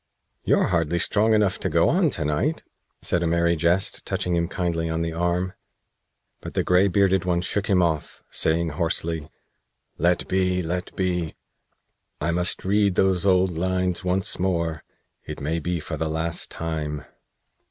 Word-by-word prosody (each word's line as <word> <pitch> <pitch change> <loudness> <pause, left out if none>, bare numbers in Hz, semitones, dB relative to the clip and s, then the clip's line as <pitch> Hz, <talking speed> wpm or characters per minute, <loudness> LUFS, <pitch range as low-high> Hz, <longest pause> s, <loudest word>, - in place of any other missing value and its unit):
"You're - - +2
hardly 85 -1 +1
strong 110 +6 +3
enough 105 -3 +2
to - - -1
go - - +3
on - - +3
to 75 - -2
night," 75 0 0 0.4
said 90 - +1
a 85 - +1
Merry 85 +1 +2
Jest, 85 +4 +1
touching 90 -1 -1
him 85 0 +1
kindly 85 -3 -2
on 80 +1 -1
the 85 0 -3
arm; 90 +2 -1 0.9
but - - -8
the - - +2
gray 90 +2 +4
bearded 95 -1 +2
one 90 -1 +1
shook 100 +3 -2
him 95 -4 +3
off, 80 -3 -2
saying 80 +1 +1
hoarsely: 80 0 -2 0.7
"Let 85 +2 +2
be! 90 -1 +1
Let 90 +2 -4
be! 90 -4 -1 0.8
I 80 +3 0
must 90 +2 -1
read 100 -1 +2
those 95 -1 +2
old 95 -1 +4
lines 90 +1 -1
once 90 +1 +1
more 85 -4 -1 0.4
it - - -6
may 80 +4 -1
be 85 +2 -2
for 80 +1 -5
the 80 +1 -2
last 80 +1 -1
time." 75 -3 -4
85 Hz, 165 wpm, -24 LUFS, 80-90 Hz, 0.9 s, gray